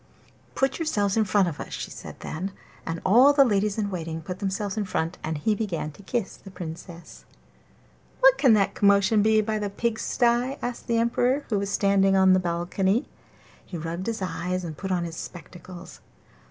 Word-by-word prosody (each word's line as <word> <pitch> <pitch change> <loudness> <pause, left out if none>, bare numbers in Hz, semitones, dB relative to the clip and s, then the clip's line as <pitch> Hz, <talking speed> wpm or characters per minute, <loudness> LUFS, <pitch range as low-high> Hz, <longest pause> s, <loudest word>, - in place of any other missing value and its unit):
'Put 270 +4 0
yourselves 205 - 0
in 220 -1 +2
front 195 -1 +3
of 160 -4 -5
us,' - - -7
she - - -5
said - - -10
then; 190 +5 -5 0.3
and 165 - -2
so - - -11
all 245 +9 +6
the 280 -1 +6
ladies 210 -2 +1
in 205 -2 -1
waiting 165 -3 -4
put 180 +3 -7
themselves 200 0 -2
in 215 - -1
front, 170 -2 -3
and 160 0 -2
he 210 +9 +1
began 190 -8 -3
to 150 - -16
kiss 205 +1 -3
the 195 - -13
Princess. 175 -1 -9 1.0
'What - - +7
can 260 -6 +6
that 200 -2 +2
commotion 200 +1 +4
be 220 +1 +4
by 215 0 -2
the 205 -1 -2
pigsties?' 235 +4 0
asked 245 0 -5
the 235 - +1
Emperor, 245 +4 +1
who 210 -3 +1
was 200 0 -3
standing 195 -1 +3
on 190 -1 +5
the 185 - +4
balcony. 185 +5 0 0.6
He 180 - -7
rubbed 170 +4 -5
his 225 -4 -2
eyes 180 +1 -3
and 160 -3 -6
put 190 +4 -5
on 180 -2 0
his 165 -1 -6
spectacles. 180 +1 -10
195 Hz, 195 wpm, -25 LUFS, 180-220 Hz, 1.0 s, What